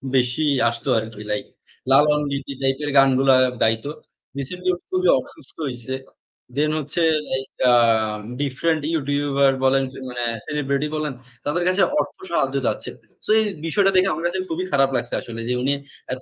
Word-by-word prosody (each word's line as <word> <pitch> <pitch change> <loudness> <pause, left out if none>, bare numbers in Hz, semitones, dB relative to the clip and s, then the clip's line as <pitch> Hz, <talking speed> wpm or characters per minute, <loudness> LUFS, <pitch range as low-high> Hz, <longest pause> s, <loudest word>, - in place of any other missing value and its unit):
বেশি 125 +4 +2 0.3
আসতো 120 0 -5
আরকি। 110 -1 -8
লাইক 105 - -2 0.5
লালন 150 +2 +5
গীতি 140 0 -4
টাইপের 135 +2 0
গানগুলা 135 0 +5 0.3
গাইত। 115 +3 +2 0.5
রিসেন্টলি 180 +7 -3 0.2
খুবই 185 -1 +1
অসুস্থ 130 - -14
হইছে। 125 0 -6 0.6
দেন 150 +1 +2
হচ্ছে 150 +4 -3 0.4
এইটা 130 -1 -1 0.7
ডিফারেন্ট 150 +4 0
ইউটিউবার 140 -2 +2
বলেন 135 0 +4 0.3
মানে 120 -1 -4 0.2
সেলিব্রিটি 145 0 -1
বলেন 150 -2 -2 0.3
তাদের 170 +4 0
কাছে 185 +2 +2 0.2
অর্থ - - -3
সাহায্য - - +1
চাচ্ছে। - - -2 0.4
সো - - -13
এই 220 - +2 0.2
বিষয়টা 195 +4 +3
দেখে 185 +1 +4
আমার 165 +2 -4
কাছে 185 +2 -3
খুবই 175 +3 -2
খারাপ 135 -1 +4
লাগছে 120 0 -2
আসলে 115 -1 -8
যে - - +1
উনি 135 +3 +2 0.4
এত 130 - -6
140 Hz, 150 wpm, -22 LUFS, 130-155 Hz, 0.7 s, লালন